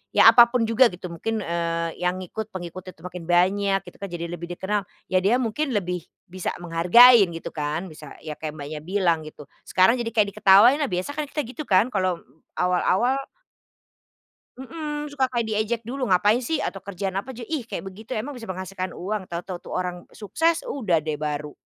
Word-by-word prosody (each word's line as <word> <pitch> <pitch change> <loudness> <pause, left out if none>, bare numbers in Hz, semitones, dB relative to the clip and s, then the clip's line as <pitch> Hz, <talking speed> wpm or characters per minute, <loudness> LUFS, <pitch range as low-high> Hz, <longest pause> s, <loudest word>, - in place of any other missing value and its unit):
ya - - +9
apa 240 -1 +8
pun 240 -1 0
juga 230 +3 +5
gitu 180 -3 -8
mungkin, 215 +5 -3
eee, 170 0 -2
yang 180 0 0
ngikut 215 +4 -6
pengikut 185 -1 -8
itu - - -22
makin 180 -2 -8
banyak 195 +3 +3
gitu - - -22
kan 200 - -5
jadi 170 -2 -5
lebih 170 0 -6
dikenal, 205 +3 -1 0.3
ya 185 - +4
dia 200 +6 +3
mungkin 255 +2 -1
lebih 180 -3 -2 0.2
bisa 185 -1 -3
menghargain 190 +7 +7
gitu 165 - -6
kan, 150 +2 -3
bisa 155 - -11
ya 155 - -5
kayak 155 -1 -5
Mbaknya 150 +1 -6
bilang 170 -2 0
gitu. 150 -1 -11 0.2
Sekarang 230 +7 +4
jadi 235 - -2
kayak 205 -2 +3
diketawain 215 +7 +6
nah 290 - +1
biasa 180 +8 -3
kan 300 0 -4
kita 295 +1 -3
gitu 265 +5 -8
kan 205 +7 +3
kalau, 185 -3 -1 0.3
awal-awal 185 +8 +2 1.4
Mhm, 295 +1 -6
suka 265 -2 +1
kayak 240 -2 -1
diejek 220 +2 -1
dulu, 255 0 -3
"Ngapain 205 +6 +4
sih?" 315 +6 -1
Atau 195 -9 -4
kerjaan 195 -1 -4
apa 195 +7 -4
aja, 240 -2 -7
"Ih 305 +1 -2
kayak - - -5
begitu 220 +4 -6
emang 275 +7 -4
bisa 230 -6 -10
menghasilkan 185 0 -4
uang?" 195 +1 -5
Tau-tau 175 +1 -5
tuh - - -13
orang 180 -1 -4
sukses 325 - -1
udah 220 - 0
deh 155 0 -2
baru. 150 0 -4
195 Hz, 190 wpm, -24 LUFS, 175-240 Hz, 1.4 s, ya